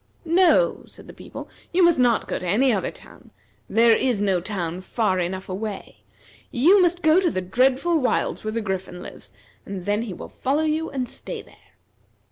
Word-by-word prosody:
"No," 370 +8 +3
said - - -15
the - - -12
people, - - -10 0.2
"you 365 +1 +3
must 340 -5 +4
not 245 -2 +2
go - - -3
to 180 - -6
any 240 +8 +3
other 195 - -1
town. - - -15 0.4
There 230 0 +5
is 245 -4 0
no 195 -3 +1
town 180 -3 -4
far 190 -1 0
enough 185 +2 -3
away. 200 +2 -6 0.5
You 350 +11 +5
must 350 -1 +1
go 315 +3 +5
to 360 - +2
the 185 - -2
dreadful 260 - +2
wilds 255 - -1
where 215 - -3
the 230 - -1
Griffin 190 -3 -5
lives; 100 - -11 0.3
and 190 -2 -7
then 205 +1 0
he 225 -5 -5
will - - -9
follow 280 +4 +1
you 315 +1 -1
and 260 -3 -3
stay - - -7
there." - - -23
230 Hz, 190 wpm, -23 LUFS, 190-315 Hz, 0.5 s, There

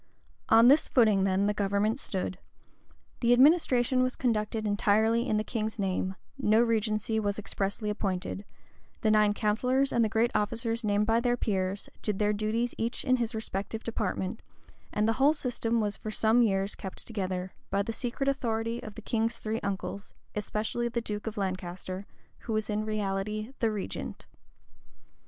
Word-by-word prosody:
On 230 +1 +7
this 285 +4 +6
footing 215 -6 +4
then 195 +1 +2
the 210 - +2
government 205 +3 0
stood. 185 -4 -3 0.8
The 240 0 +4
administration 255 -2 +4
was 255 0 +1
conducted 220 -3 0
entirely 220 +3 +2
in 215 - +2
the 215 - 0
king's 220 -1 -3
name: 190 -1 -1 0.2
no 220 -3 +4
regency 220 -1 +1
was 205 -2 -1
expressly 205 +1 -3
appointed: 195 -1 -3 0.6
the 215 - +3
nine 210 -1 +4
counsellors 250 +6 +1
and 235 - +3
the 220 - +1
great 225 +2 +2
officers 230 +2 -1
named 205 0 +2
by 225 +1 +3
the 245 0 +1
peers, 195 -3 -1
did 210 -3 -1
their 210 0 +2
duty 215 +3 0
each 230 +2 -2
in 255 -1 +4
his 235 -1 -2
respective 220 0 -4
department; 220 -2 -2 0.5
and 210 +1 +1
the 225 - +3
whole 290 +3 +6
system 235 -5 -1
was 210 -2 0
for 215 - -6
some 220 +2 +3
years 195 -3 +2
kept 190 - -4
together, 185 -4 -3 0.2
by 200 0 +1
the 225 - -4
secret 250 +4 -3
authority 230 -3 -1
of 215 - -9
the 225 - -9
king's 225 0 -1 0.2
uncles, 200 0 -4 0.2
especially 215 +3 -2
of 235 - -7
the 235 - +1
duke 210 -1 -5
of 220 0 -4
Lancaster, 185 0 -4 0.3
who 225 - -4
was 215 0 -1
in 210 +1 -1
reality 215 +2 -2
the 225 - +2
regent. 210 -2 -5
215 Hz, 165 wpm, -29 LUFS, 200-230 Hz, 0.8 s, On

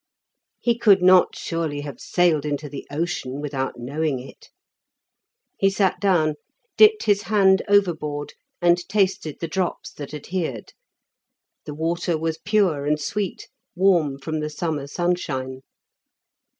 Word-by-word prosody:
He 235 -1 0
could 200 -6 +5
not 185 0 +5
surely 160 -4 -3
have 145 -4 -8
sailed 170 -5 +2
into 150 0 -3
the 140 -1 -8
ocean 145 -3 -3
without 140 -2 -3
knowing 140 +4 -2
it? 125 +2 -12 1.1
He 195 - +4
sat 195 -1 +1
down, 160 -7 +2 0.4
dipped 430 0 +6
his 205 -1 +2
hand 195 -3 +3
overboard 155 -8 +1 0.3
and 175 0 +5
tasted 190 -7 0
the 165 - -3
drops 180 +2 -3
that 145 -2 -8
adhered; 150 - -4 0.9
the 150 - -6
water 170 +1 -1
was 160 0 -3
pure 185 -8 +1
and 150 +1 +1
sweet, 200 +5 -3 0.3
warm 175 -7 +2
from 155 +3 -4
the 150 0 -3
summer 150 -2 -3
sunshine. 140 -6 -2
160 Hz, 130 wpm, -23 LUFS, 145-190 Hz, 1.1 s, dipped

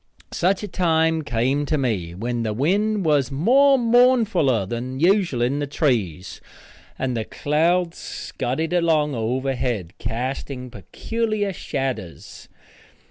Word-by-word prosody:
Such 185 +3 0
a - - -3
time 160 -3 +1
come 130 +3 0
to 155 - +1
me, 100 -11 -2
when 120 +4 -3
the 110 -2 -1
wind 200 - +1
was 145 -4 +2
more 265 - +4
mournfuller 230 - +3
than 125 +4 -4
usual 175 - +2
in 135 +4 0
the 145 - -2
trees, 110 - -1 0.6
and 130 -2 -2
the 115 - -1
clouds 165 +7 0
scudded 160 +7 -4
along 160 -4 +2
overhead, 125 -5 -2
casting 125 +1 -4
peculiar 210 - -3
shadders. 135 - -5
140 Hz, 120 wpm, -22 LUFS, 120-180 Hz, 0.6 s, more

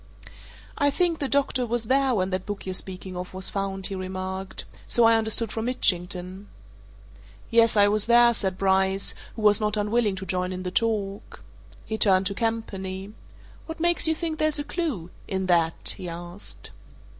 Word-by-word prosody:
"I 285 -1 +4
think 335 +2 +1
the 280 - -1
doctor 275 -2 +1
was 240 -1 -1
there 265 +1 +2
when 185 -1 0
that 185 +1 -3
book 205 -1 -5
you're 190 - -3
speaking 185 0 -5
of 180 +1 -6
was 190 0 -1
found," 195 -1 -2
he 195 - 0
remarked. 190 0 -3 0.2
"So 240 - +2
I 230 0 +6
understood 220 0 +1
from 225 0 -3
Mitchington." 185 -4 -1 1.0
"Yes, 230 -1 +4
I 205 0 +6
was 210 +1 +2
there," 240 0 +6
said 190 -5 -2
Bryce, 190 0 +2 0.2
who 220 - -6
was 210 0 +5
not 210 0 +1
unwilling 210 0 +1
to 190 0 -6
join 180 0 -1
in 185 0 -5
the 180 - -3
talk. 205 -2 -2 0.4
He 220 0 -4
turned 190 -2 +4
to 200 - 0
Campany. 200 -3 -3 0.5
"What 320 0 -7
makes 345 0 +3
you 320 - +2
think 315 -1 -3
there's 310 -1 +2
a 290 - -1
clue 285 - -3 0.2
in 190 -1 -2
that?" 170 -3 +2
he 180 - -6
asked. 175 +3 -5
200 Hz, 180 wpm, -25 LUFS, 185-235 Hz, 1.0 s, I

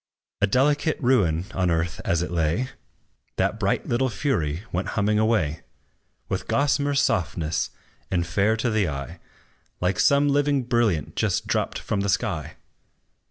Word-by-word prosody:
A 100 - +4
delicate 145 +7 +2
ruin 95 - +2
on 90 -2 +1
earth 80 0 -1
as 85 0 +1
it 90 - -5
lay, 85 +9 0 0.7
That - - 0
bright - - 0
little 130 +2 +1
fury 90 - -1
went 90 +2 -2
humming 105 +1 +2
away, 110 -9 +1 0.7
With - - -3
gossamer 145 0 +1
softness, 85 - 0 0.4
and 85 -2 0
fair 100 +6 +1
to 115 +1 0
the 105 -5 +1
eye, 70 -2 -6 0.6
Like 90 0 0
some 140 0 +4
living 145 -1 +2
brilliant 115 - 0
just - - 0
dropped - - -1
from - - -2
the 100 0 -1
sky. 85 -5 -1
100 Hz, 145 wpm, -24 LUFS, 85-130 Hz, 0.7 s, A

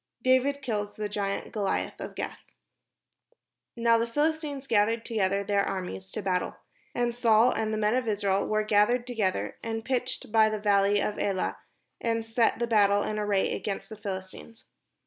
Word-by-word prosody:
DAVID 265 +2 +2
KILLS 205 -4 -2
THE 210 -1 -3
GIANT 200 -1 -3
GOLIATH 205 -3 -2
OF - - -7
GATH - - -5 1.4
Now 230 -1 +3
the 230 - 0
Philistines 295 +1 -1
gathered 225 -1 +2
together 200 -3 0
their 200 0 +1
armies 190 0 -4
to 215 - -4
battle. 180 -1 -1 0.4
And 240 -1 0
Saul 235 0 +4
and 220 -1 -1
the 215 - -1
men 210 +1 +2
of 250 -1 0
Israel 200 -2 +1
were 215 0 +1
gathered 215 +3 +3
together, 220 -7 -1
and 225 -1 -4
pitched 250 -4 -2
by 220 -1 +5
the 215 - -2
valley 205 -1 +3
of 210 - -2
Elah, 195 -2 -1 0.4
and 230 -1 -1
set 225 +1 +2
the 235 - 0
battle 205 -3 +3
in 215 0 -2
array 205 -2 +1
against 200 -2 -4
the 220 - -7
PhiHstines. 195 +2 -7
215 Hz, 165 wpm, -28 LUFS, 205-235 Hz, 1.4 s, by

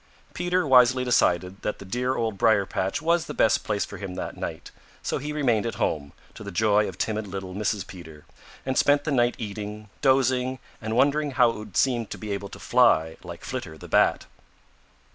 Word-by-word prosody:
Peter 180 0 0
wisely 130 -1 +5
decided 90 -5 +1
that 105 - -2
the 100 - -11
dear 125 +6 -1
Old 115 -4 -1
Briar 100 0 +3
patch 95 +9 -2
was 170 0 +2
the - - -6
best 110 - +3
place 105 -2 -1
for - - -9
him 95 -2 -6
that - - -5
night, - - -6 0.3
so - - -1
he 150 +2 -4
remained 125 -8 +1
at 115 - -3
home, 70 -2 -1 0.2
to - - -10
the 100 - -6
joy 105 +2 +2
of 90 - -10
timid 110 0 -2
little 95 -1 -6
Mrs. 105 0 -1
Peter, 80 -5 -12 0.4
and 130 0 +1
spent 145 0 +4
the 155 - -2
night 120 -2 +2
eating, 105 0 -6
dozing 130 -1 +2 0.2
and 110 0 -3
wondering 145 +4 +3
how 125 -2 +6
it - - -8
would 105 -3 -7
seem 120 -4 +2
to - - -7
be 105 -1 -6
able 100 0 -4
to - - -10
fly 80 -11 +3
like - - -9
Flitter 80 0 -5
the - - -11
Bat. - - +3
110 Hz, 200 wpm, -25 LUFS, 100-130 Hz, 0.4 s, how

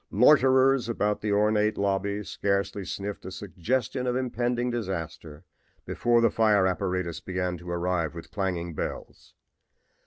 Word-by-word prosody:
Loiterers 130 +1 +5
about 105 -2 0
the 105 - -1
ornate 105 +1 +2
lobby 100 +1 -1
scarcely 100 0 -1
sniffed 100 +2 -5
a - - -6
suggestion 105 +7 -2
of 125 - 0
impending 125 -1 -1
disaster 80 -8 -5 0.4
before 120 -1 +2
the 115 - +4
fire 105 -4 +3
apparatus 90 -2 -1
began 90 -1 -3
to 85 +1 -10
arrive 85 -2 -1
with 85 - -9
clanging 90 -4 -2
bells. - - -6
100 Hz, 130 wpm, -27 LUFS, 90-115 Hz, 0.4 s, Loiterers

